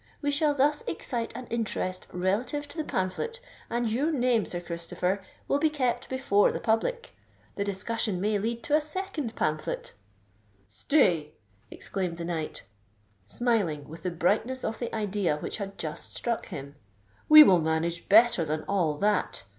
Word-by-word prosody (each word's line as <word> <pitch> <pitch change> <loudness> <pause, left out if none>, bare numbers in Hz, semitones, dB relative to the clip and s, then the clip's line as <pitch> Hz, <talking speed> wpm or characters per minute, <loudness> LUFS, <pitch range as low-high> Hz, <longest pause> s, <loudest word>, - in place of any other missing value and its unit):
We 290 -1 0
shall 290 0 +3
thus 290 +2 +2
excite 230 +8 -2
an 250 +1 -6
interest 210 -5 -2
relative 225 +11 -1
to 330 - -9
the 315 - -1
pamphlet, 190 - -2 0.3
and 235 0 0
your 265 +9 +1
name, 245 -6 +2
Sir 175 - -2
Christopher, 175 +3 -3 0.3
will 280 - +2
be 315 +1 +3
kept 260 -5 -1
before 260 -6 +3
the - - -4
public. 465 - -1 0.4
The 200 - -1
discussion 200 0 -1
may 205 +2 +1
lead 230 +3 -3
to 295 - +2
a 310 - +4
second 305 - -4
pamphlet——" 155 0 -2 0.7
"Stay!" 155 - +2 0.4
exclaimed 180 -3 -4
the 170 - -5
knight, 165 -3 -4 0.6
smiling 180 - 0
with 160 +2 -10
the 185 - -1
brightness 210 +10 0
of 220 - -3
the 240 - -3
idea 205 -7 0
which - - -4
had 200 -2 -6
just 155 0 -4
struck 235 -2 -2
him: 140 +1 -8 0.5
"we 305 0 +12
will 185 -10 +5
manage 160 +2 -1
better 225 -3 +6
than 155 0 -2
all 175 -7 0
that! 210 +4 0
210 Hz, 160 wpm, -28 LUFS, 175-255 Hz, 0.7 s, we